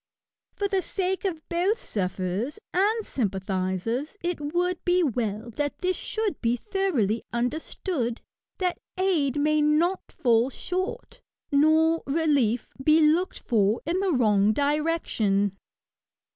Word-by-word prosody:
For 405 - 0
the 390 -1 0
sake 380 +2 -2
of 325 -5 -3
both 370 +7 +1
sufferers 190 - -2 0.2
and 425 +5 +2
sympathisers^ 195 - -2
it 350 -3 -2
would 350 +4 -1
be 360 0 +3
well 235 -4 -2
that 290 +5 -2
this 370 0 0
should 435 -4 -3
be 235 +1 +1
thoroughly 275 - 0
understood, 245 - -2 0.4
that 365 -2 -1 0.2
aid 315 -8 +1
may 305 +1 +3
not 320 +5 +1
fall 235 0 +2
shorty 370 - -4 0.3
nor 315 +3 +4
relief 275 -7 +1 0.2
be 310 +3 +5
looked 320 +4 +3
for 215 -1 +2
in 340 +4 0
the 390 -1 +1
wrong 215 -6 +3
direction. 280 - +1
300 Hz, 120 wpm, -26 LUFS, 230-360 Hz, 0.4 s, be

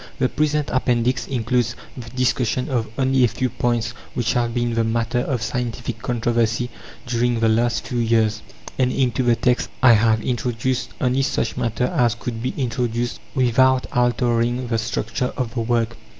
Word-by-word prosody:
The 130 - +1
present 150 -1 0
Appendix 125 -1 +1
includes 120 -2 0 0.2
the 120 -3 -8
discussion 125 +1 0
of 120 -4 0
only 130 -1 +3
a - - +6
few 130 +2 -2
points 120 -1 -1 0.2
which 120 -1 0
have 120 -1 +1
been 120 0 -1
the 115 0 +1
matter 115 +2 0
of 125 -2 -1
scientific 120 -3 -3
controversy 120 0 0 0.3
during 120 -1 0
the 115 - +3
last 120 +2 +1
few 125 - -2
years; 110 -2 +2 0.4
and 130 -1 +3
into 125 -2 +1
the 120 -2 +3
text 125 +2 +1
I 125 -2 +8
have 110 0 +3
introduced 125 0 -1
only 130 +1 +1
such 135 - -1
matter 120 0 -1
as 125 -6 +1
could 120 -1 -5
be 125 - -3
introduced 120 -2 -1 0.2
without 130 0 +3
altering 120 0 +1
the 115 -1 +1
structure 115 +2 -2
of 120 -4 -2
the 120 - -1
work. 115 0 0
120 Hz, 165 wpm, -22 LUFS, 115-125 Hz, 0.4 s, I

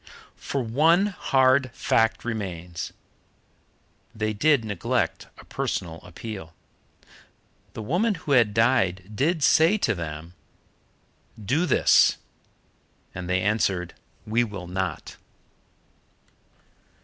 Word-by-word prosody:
For 135 -2 -2
one 160 - +3
hard 130 -8 +2
fact 115 -4 +1
remains. 90 -7 -5 1.2
They 110 0 -1
did 140 +2 +2
neglect 100 -6 -2
a - - -14
personal 80 0 -4
appeal. 90 -3 -9 1.2
The 110 - -6
woman 195 - +1
who 160 -3 -6
had 120 -6 +4
died 105 -5 +1
did 155 - 0
say 165 +8 +5
to 115 - +1
them, 80 -1 -7 1.1
"Do 135 - 0
this," 135 - +4 1.0
and 90 -1 -6
they 90 0 +1
answered, 95 -4 0 0.3
"We 115 +3 +1
will 100 -5 -6
not." 95 +1 -4
110 Hz, 100 wpm, -25 LUFS, 95-135 Hz, 1.2 s, say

